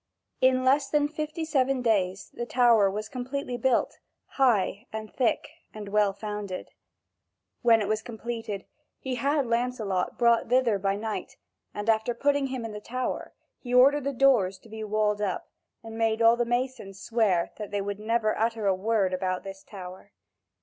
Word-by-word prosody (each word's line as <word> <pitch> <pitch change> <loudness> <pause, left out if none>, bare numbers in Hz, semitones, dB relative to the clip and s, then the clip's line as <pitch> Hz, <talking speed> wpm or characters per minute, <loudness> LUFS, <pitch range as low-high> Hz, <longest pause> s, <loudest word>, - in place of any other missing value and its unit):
In 255 0 +4
less 275 +1 +3
than 290 0 +2
fifty 305 +2 -4
seven 270 -4 +1
days 195 -5 0
the 240 - -5
tower 235 -6 +4
was 210 +2 -4
completely 260 0 -4
built, 255 -1 +1 0.3
high 230 -3 +1
and 215 -1 -6
thick 245 -4 +1 0.3
and 210 -2 -7
well 210 -1 +3
founded. 205 -1 -6 0.9
When 225 -2 +5
it - - -3
was 215 +1 0
completed, 225 -3 -5 0.3
he 265 - -4
had 280 +3 +1
Lancelot 230 -6 -1
brought 235 -1 +3
thither 245 -5 +3
by 195 0 0
night, 215 +1 -5 0.3
and 205 +1 -6
after 225 +1 +2
putting 285 +2 +1
him 255 -3 -4
in 225 - -5
the 210 0 -7
tower, 255 +3 -4 0.2
he 250 -1 -3
ordered 275 +3 +5
the 280 - 0
doors 240 -8 +3
to 225 - -17
be 220 0 -6
walled 210 0 0
up, 195 -3 -3 0.3
and 225 0 -8
made 225 0 +1
all 230 0 +6
the 240 0 0
masons 240 -5 -3
swear 210 -8 +1
that 210 -2 -6
they 205 - -2
would 200 0 -4
never 215 0 +1
utter 225 -1 -1
a 195 - +4
word 195 -1 0
about 185 0 -1
this 195 0 -8
tower. 185 - -10
225 Hz, 170 wpm, -27 LUFS, 205-255 Hz, 0.9 s, all